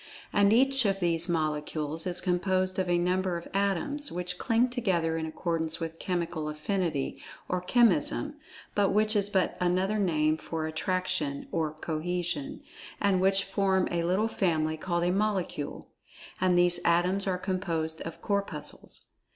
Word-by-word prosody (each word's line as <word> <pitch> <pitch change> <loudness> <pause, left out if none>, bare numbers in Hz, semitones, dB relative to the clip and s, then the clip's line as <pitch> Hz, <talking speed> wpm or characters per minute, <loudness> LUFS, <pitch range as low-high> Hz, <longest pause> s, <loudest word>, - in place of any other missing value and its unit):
And 200 0 +5
each 270 +3 +4
of 195 -1 +1
these 170 -2 0
Molecules 155 0 -2
is 180 -1 0
composed 185 +1 0
of 185 -1 0
a 175 - +3
number 180 0 +1
of 170 - -8
Atoms, 200 - 0
which 180 +1 -3
cling 230 +1 +3
together 180 -10 0
in 160 -1 -2
accordance 160 0 -2
with 165 0 -5
Chemical 170 -4 -2
Affinity, 155 -2 -2 0.3
or 180 0 -1
Chemism—but 235 - +1
which 215 +1 +2
is 200 -1 +2
but 190 -3 +1
another 185 +4 +1
name 155 -5 +2
for 160 0 -4
Attraction, 160 -2 -2
or 160 -2 0
Cohesion—and 180 - -3
which 195 +1 +3
form 190 -1 +1
a 170 -1 0
little 185 +6 +1
family, 160 -7 0
called 170 +2 -1
a 175 - +2
Molecule. 195 -6 -2 0.5
And 180 -1 +3
these 175 0 +5
Atoms 180 +4 +2
are 185 -1 +1
composed 175 -4 -2
of 165 - -7
Corpuscles. 200 -8 -3
180 Hz, 145 wpm, -29 LUFS, 165-195 Hz, 0.5 s, And